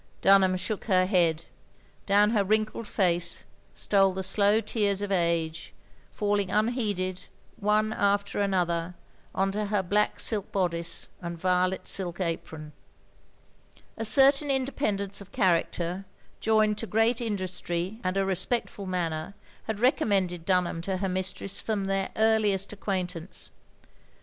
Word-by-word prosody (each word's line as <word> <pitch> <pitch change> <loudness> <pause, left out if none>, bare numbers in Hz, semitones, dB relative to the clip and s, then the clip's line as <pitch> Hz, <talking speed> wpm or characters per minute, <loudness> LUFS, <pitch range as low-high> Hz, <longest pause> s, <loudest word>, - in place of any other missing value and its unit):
Dunham 190 -1 +5
shook 210 +3 -4
her 185 -3 +3
head. 170 -4 +1 0.6
Down 205 +1 +4
her 210 -3 +2
wrinkled 215 +2 -1
face 175 -4 0 0.3
stole 195 -2 +2
the 190 - -2
slow 200 +3 +3
tears 205 -2 0
of 200 - -4
age, 170 -3 -1 0.4
falling 205 -2 0
unheeded, 205 -4 -1 0.3
one 215 0 +1
after 200 0 0
another, 175 -3 0 0.4
on 195 +1 +1
to 210 +1 -2
her 205 -1 0
black 205 +3 0
silk 210 -3 -2
bodice 170 -3 -1
and 170 -1 -5
violet 185 +1 0
silk 175 -2 -2
apron. 160 -3 -4 1.2
A 225 - -4
certain 275 +5 +5
independence 235 -8 -1
of 200 0 -13
character, 180 -2 0 0.3
joined 215 -1 +2
to 225 - -4
great 225 +3 +2
industry 185 -2 -3
and 185 +1 -1
a 195 - +1
respectful 195 +2 -1
manner, 170 -1 -3 0.3
had 220 -2 -3
recommended 200 - +1
Dtmham 180 -3 +1
to 190 +2 -2
her 195 +1 -2
ndstress 185 +1 -2
from 210 -3 -2
their 195 0 -1
earliest 215 -3 +2
acquaintance. 185 -4 -3
195 Hz, 130 wpm, -27 LUFS, 180-210 Hz, 1.2 s, Dunham